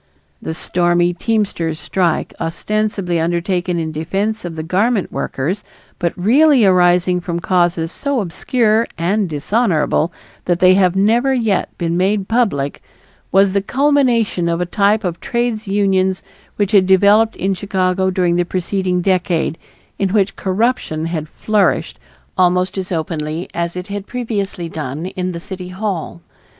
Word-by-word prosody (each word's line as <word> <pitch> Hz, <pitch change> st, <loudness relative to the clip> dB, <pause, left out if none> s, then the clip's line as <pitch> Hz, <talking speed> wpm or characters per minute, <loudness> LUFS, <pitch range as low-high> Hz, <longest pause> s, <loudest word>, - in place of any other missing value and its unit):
The 160 Hz, -, -4 dB
stormy 175 Hz, +1 st, +1 dB
teamsters' 185 Hz, -6 st, -1 dB
strike, 175 Hz, -4 st, -1 dB
ostensibly 185 Hz, +1 st, -1 dB
undertaken 175 Hz, +2 st, -1 dB
in 160 Hz, -1 st, -2 dB
defense 195 Hz, +8 st, -2 dB
of 175 Hz, -2 st, -6 dB
the 160 Hz, -, -4 dB
garment 200 Hz, +5 st, 0 dB
workers, 175 Hz, +10 st, -3 dB, 0.4 s
but 170 Hz, -2 st, 0 dB
really 255 Hz, -, +4 dB
arising 180 Hz, -1 st, +3 dB
from 170 Hz, -1 st, -3 dB
causes 175 Hz, -2 st, +1 dB
so 280 Hz, +3 st, -2 dB
obscure 220 Hz, +4 st, +1 dB
and 190 Hz, +3 st, 0 dB
dishonorable 160 Hz, -, +1 dB, 0.3 s
that 175 Hz, -1 st, +1 dB
they 185 Hz, 0 st, +6 dB
have 185 Hz, -2 st, +3 dB
never 235 Hz, +7 st, +3 dB
yet 220 Hz, -6 st, 0 dB
been 170 Hz, -1 st, -1 dB
made 195 Hz, +1 st, +1 dB
public, 205 Hz, -, 0 dB, 0.5 s
was 195 Hz, 0 st, +4 dB
the 200 Hz, -, +2 dB
culmination 245 Hz, -8 st, +1 dB
of 170 Hz, 0 st, 0 dB
a 180 Hz, -, 0 dB
type 205 Hz, +4 st, +2 dB
of 175 Hz, -2 st, -3 dB
trades 235 Hz, -3 st, -2 dB
unions 190 Hz, -2 st, +1 dB, 0.3 s
which 205 Hz, -1 st, 0 dB
had 195 Hz, -4 st, +5 dB
developed 205 Hz, +4 st, +4 dB
in 195 Hz, +1 st, -1 dB
Chicago 190 Hz, -1 st, 0 dB
during 180 Hz, -2 st, +1 dB
the 175 Hz, -, +2 dB
preceding 185 Hz, 0 st, -1 dB
decade 180 Hz, -4 st, +1 dB, 0.4 s
in 195 Hz, -, +1 dB
which 200 Hz, 0 st, +1 dB
corruption 190 Hz, -5 st, -1 dB
had 160 Hz, -2 st, -4 dB
flourished 215 Hz, +2 st, 0 dB, 0.4 s
almost 180 Hz, +1 st, +2 dB
as 190 Hz, -1 st, -4 dB
openly 160 Hz, 0 st, -3 dB
as 170 Hz, 0 st, -2 dB
it 180 Hz, 0 st, -5 dB
had 200 Hz, 0 st, -5 dB
previously 205 Hz, -7 st, -3 dB
done 155 Hz, 0 st, -5 dB
in 185 Hz, 0 st, -3 dB
the 170 Hz, -, -6 dB
City 185 Hz, 0 st, -8 dB
Hall. 185 Hz, -3 st, -4 dB
185 Hz, 145 wpm, -18 LUFS, 170-205 Hz, 0.5 s, they